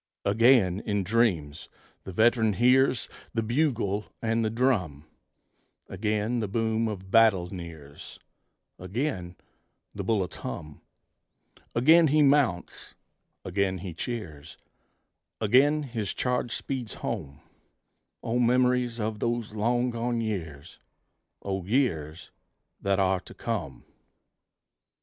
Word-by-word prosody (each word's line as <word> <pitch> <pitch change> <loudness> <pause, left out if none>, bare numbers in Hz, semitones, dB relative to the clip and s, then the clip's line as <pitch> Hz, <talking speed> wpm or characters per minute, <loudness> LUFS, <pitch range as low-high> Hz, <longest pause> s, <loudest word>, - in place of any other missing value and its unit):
Again, 105 -3 +4
in 100 -2 -1
dreams, 90 -8 0 0.4
the 95 - -6
veteran 110 +2 +3
hears 125 +2 +3 0.3
The 115 - +1
bugle 115 -5 0
and 115 0 0
the 110 - +1
drum; 105 - 0 0.8
Again 105 +4 -1
the 110 - -1
boom 110 +2 0
of 95 -3 -6
battle 100 -6 +4
nears, 80 -5 -10 0.6
Again 90 - -3 0.6
the - - -5
bullets 100 -6 -1
hum: 75 +4 -7 0.9
Again 160 +7 +6
he 150 +1 +4
mounts, 135 -11 +1 0.5
again 95 0 0
he 90 -1 -7
cheers, 80 -7 -6 0.8
Again 135 +8 +4
his 115 -7 -4
charge 125 -1 -1
speeds 125 -5 -4
home 70 +1 -4 0.8
O 120 +2 0
memories 125 0 +2
of 110 -1 -2
those 115 -2 -2
long 120 +3 +1
gone 120 0 -2
years! 85 -11 -5 0.6
O 95 -2 -3
years 90 - -1 0.5
that 100 0 +1
are 95 -1 +2
to - - -14
come! 85 - -4
110 Hz, 110 wpm, -27 LUFS, 95-120 Hz, 0.9 s, Again